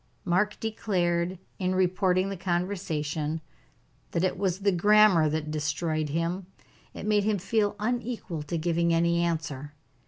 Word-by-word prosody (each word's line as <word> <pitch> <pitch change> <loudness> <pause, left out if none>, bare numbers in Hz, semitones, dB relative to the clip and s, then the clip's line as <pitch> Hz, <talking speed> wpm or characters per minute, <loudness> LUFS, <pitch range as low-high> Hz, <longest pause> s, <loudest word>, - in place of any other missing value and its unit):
Mark 190 +4 +1
declared, 185 -5 0 0.2
in 185 -1 0
reporting 185 0 +2
the 195 - -3
conversation, 165 -4 -2 0.7
that 170 - +1
it 185 - +1
was 190 -1 -1
the 200 0 +3
grammar 195 -3 +5
that 155 0 -2
destroyed 155 0 -1
him. 170 +4 -2 0.5
It - - -6
made 210 -1 +3
him 210 0 +1
feel 205 +2 0
unequal 235 -7 -3
to 150 +3 -3
giving 170 +1 +1
any 170 +1 +2
answer. 155 -4 -3
175 Hz, 135 wpm, -27 LUFS, 165-200 Hz, 0.7 s, grammar